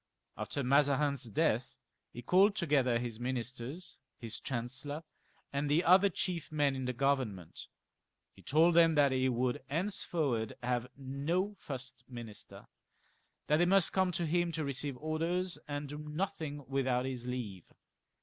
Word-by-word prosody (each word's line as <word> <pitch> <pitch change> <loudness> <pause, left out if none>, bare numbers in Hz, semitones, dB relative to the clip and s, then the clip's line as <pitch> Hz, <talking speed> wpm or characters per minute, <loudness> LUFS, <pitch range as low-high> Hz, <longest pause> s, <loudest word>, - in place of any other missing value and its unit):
After 140 - -3
Mazarin's 140 0 +3
death 110 - 0 0.3
he 120 - -9
called 195 - +5
together 140 - +2
his 120 -2 -4
ministers, 130 - -4 0.2
his 115 -2 -6
chancellor,. 135 +5 -4 0.5
and 140 +1 0
the 155 +4 +3
other 185 +3 +6
chief 175 -3 -3
men 145 -3 +2
in 130 -1 -3
the 125 - 0
Government. 125 - -1 0.7
He - - -16
told 160 +4 +4
them 165 -1 +6
that 145 -2 +5
he 130 0 +2
would 125 0 0
henceforward 150 - 0
have 125 0 0
no 145 +9 -1
first 130 -2 -7
minister, 120 -4 -9 0.8
that 150 - +3
they 175 - +4
must 195 -1 +4
come 190 -1 +2
to 170 - -1
him 175 +2 +1
to 160 -1 -2
receive 140 -1 -1
orders, 165 +5 -1
and 145 0 -3
do 150 +2 -7
nothing 150 -2 -4
without 130 -2 +1
his 125 -2 -4
leave. 110 -8 -5
140 Hz, 145 wpm, -33 LUFS, 125-165 Hz, 0.8 s, other